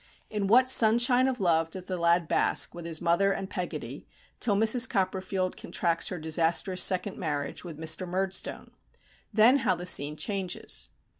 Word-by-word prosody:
In 210 -2 -2
what 250 +5 +5
sunshine 245 +2 +4
of 260 -2 -3
love 165 -3 +1
does 185 +2 -8
the 185 - -4
lad 170 -1 +1
bask - - +1
with 170 -1 -8
his 165 0 -3
mother 175 +3 +2
and 195 0 -4
Peggotty, 180 -3 -6 0.3
till 210 -4 +1
Mrs. 225 +4 +4
Copperfield 190 -2 -2
contracts 170 -2 -1
her 180 - -4
disastrous 165 +3 0
second 190 +1 +1
marriage 145 -4 -4
with 170 -4 -9
Mr. 160 +3 -2
Murdstone! 190 +2 -3 0.6
Then 230 +5 +5
how 230 -8 0
the 175 +1 -8
scene 150 -3 +2
changes. 190 0 -2
185 Hz, 160 wpm, -27 LUFS, 170-210 Hz, 0.6 s, what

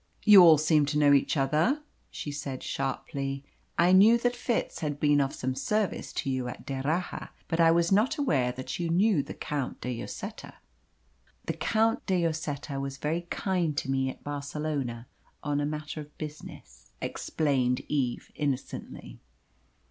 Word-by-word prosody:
"You 210 -3 +10
all 165 -3 +8
seem 155 -1 +3
to 150 +1 0
know 145 -1 +5
each 140 +2 +2
other," 155 - +2 0.3
she 145 - -6
said 140 -2 -5
sharply. 135 0 -3 0.3
"I 175 +1 +5
knew 210 +5 +7
that 245 +1 0
Fitz 245 -1 -2
had 145 -3 -3
been 145 -1 +4
of 135 0 0
some 130 +1 -3
service 210 +8 -1
to - - -2
you 130 -1 -2
at 125 - -8
D'Erraha; 145 +6 -2 0.2
but 165 - -2
I 165 -1 +6
was 170 +1 +3
not 230 +11 +3
aware 140 - +1
that 130 +6 -6
you 170 -1 -1
knew 185 -1 +3
the 140 - -8
Count 145 -4 -4
de 125 0 -3
Lloseta." - - -7 0.9
"The - - -1
Count 225 +1 +1
de 180 -3 +2
Lloseta 145 -3 -4
was 135 0 -5
very 165 +5 -2
kind 175 -6 -1
to 135 - -1
me 135 0 +1
at - - -9
Barcelona 140 -4 -3 0.4
on 145 -1 0
a 145 - 0
matter 150 0 -5
of 150 0 -14
business," 105 - -9
explained 130 -5 0
Eve 130 -5 -2
innocently. 135 - -4
150 Hz, 165 wpm, -28 LUFS, 135-170 Hz, 0.9 s, You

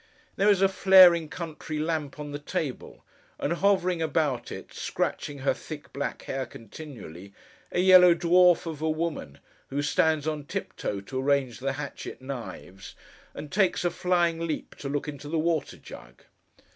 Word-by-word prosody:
There 200 +2 +3
is 195 -2 +4
a - - +7
flaring 185 -4 +6
country 155 -2 -6
lamp 155 -2 -2
on 150 -1 -6
the 145 - -5
table; 145 -2 -5 0.4
and, 150 - 0
hovering 185 -2 +1
about 150 -5 -1
it, - - -9
scratching 145 - -3
her - - +3
thick 150 -2 -10
black 140 - -4
hair 135 -1 -4
continually, 100 - -11 0.4
a - - -1
yellow 180 -2 +8
dwarf 175 +1 +4
of 160 -3 -6
a 160 - 0
woman, 155 - -3 0.3
who 145 +2 -2
stands 155 0 +1
on 150 -2 -3
tiptoe 100 -6 -4
to 130 +6 -4
arrange 135 -3 0
the 135 +1 -2
hatchet 140 0 -7
knives, 115 -7 -8 0.4
and 150 - -8
takes 190 -3 +1
a 175 - +2
flying 170 -2 0
leap 155 - -4
to 140 - -5
look 145 +1 -2
into 145 0 -7
the 165 - -1
water 160 -1 -1
jug. - - -13
155 Hz, 160 wpm, -27 LUFS, 140-170 Hz, 0.4 s, yellow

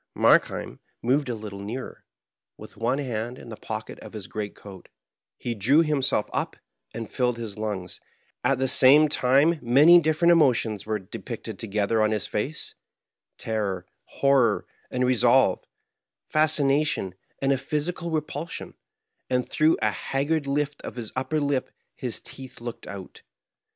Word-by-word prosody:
Markheim - - +2 0.2
moved 135 +3 +1
a 120 - -1
little 105 -2 -8
nearer, 110 +6 -7 0.5
with - - -12
one 120 +5 0
hand 120 -3 -3
in - - -11
the - - -7
pocket - - -7
of - - -11
his - - -7
great 105 -1 -5
coat; 95 -3 -13 0.5
he 120 - -3
drew 130 - +4
himself 140 -8 +1
up - - -2 0.4
and 115 -1 -6
filled 125 -2 -1
his 110 -4 -6
lungs; 105 -4 -4 0.4
at 135 - +2
the 130 +1 0
same 140 +4 +7
time 145 +4 +3
many 145 +9 +7
different 160 +2 +3
emotions 120 - +2
were 110 -1 0
depicted 95 -2 -8
together 105 +1 0
on 110 - +3
his 110 -1 -1
face 140 +9 -2 0.3
— - - -64 0.3
terror, 100 -5 -2 0.2
horror, 135 -6 +2 0.2
and 125 0 0
resolve, 125 -3 +3 0.6
fascination 145 - +2 0.3
and 135 0 +2
a - - 0
physical 160 +5 -3
re 160 -2 +1
pulsion; 150 +2 -7 0.6
and 125 -1 0
through 155 +1 +3
a 110 - +3
haggard 145 +6 -1
lift 145 +1 -1
of - - -7
his 115 -3 -6
upper 130 +4 -1
lip 140 -2 -1 0.3
his 125 -3 -3
teeth 130 -1 -11
looked 120 0 -7
out. 95 -2 -9
130 Hz, 150 wpm, -25 LUFS, 110-145 Hz, 0.6 s, same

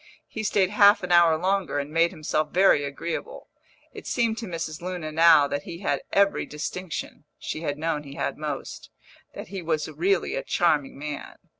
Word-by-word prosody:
He 220 - -6
stayed 200 -3 +1
half 205 -1 +5
an 180 - -4
hour 170 -2 +6
longer, 190 -1 0
and 145 +1 -3
made 165 +2 +3
himself 155 -3 -2
very 185 -5 +4
agreeable. 165 - -5 0.4
It - - -10
seemed 230 -1 0
to 230 - -6
Mrs. 165 -3 -5
Luna 175 -3 -5
now 160 -2 +6
that 145 0 -3
he 170 +4 -9
had - - -1
every 200 0 +2
distinction 150 0 -6
(she 155 - -5
had 145 -3 -3
known 160 -1 -1
he 140 -1 -11
had - - -2
most), 150 -3 -6 0.5
that - - -8
he 195 -1 -5
was 160 -3 -1
really 175 +5 0
a 135 - -1
charming 150 -6 0
man. 145 0 -6
165 Hz, 180 wpm, -25 LUFS, 150-185 Hz, 0.5 s, hour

